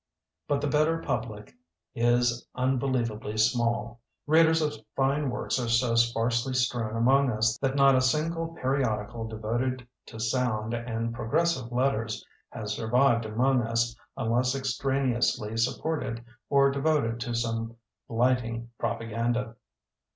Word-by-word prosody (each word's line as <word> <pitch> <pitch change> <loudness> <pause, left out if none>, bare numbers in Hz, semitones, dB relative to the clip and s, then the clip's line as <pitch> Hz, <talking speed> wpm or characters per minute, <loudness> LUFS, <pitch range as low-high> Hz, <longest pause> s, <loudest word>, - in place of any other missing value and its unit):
But 140 - 0
the - - 0
better 155 +3 +2
public 110 -9 -4 0.4
is 120 0 +1
unbeliev 130 -2 +1
ably 105 0 -6
small. 115 0 +1 0.2
Readers 160 +1 +5
of 150 -2 0 0.2
fine 140 +1 +1
works 125 - -2
are 120 -2 -2
so 120 0 +2
sparsely 115 +2 +1
strewn 120 -3 0
among 135 +4 +4
us 110 -1 +1
that 135 0 0
not 135 -1 +6
a 130 - +4
single 165 +5 0
periodical 120 -4 -1
devoted 120 +3 -2 0.2
to 110 - -10
sound 110 -1 -1
and 115 -1 -3
progressive 130 +1 0
letters 120 -3 -1 0.2
has 105 -2 -5
survived 115 +1 +2
among 125 +4 +2
us 115 +1 0 0.2
unless 125 +2 +1
extraneously 130 -4 0
support 155 +7 0
ed 115 -1 -5 0.2
or 140 -1 +4
devoted 140 -5 0
to 120 0 -3
some 115 -1 -2 0.3
blighting 120 -1 0
propa 115 -1 -2
ganda. 115 +1 -1
120 Hz, 130 wpm, -27 LUFS, 115-135 Hz, 0.4 s, not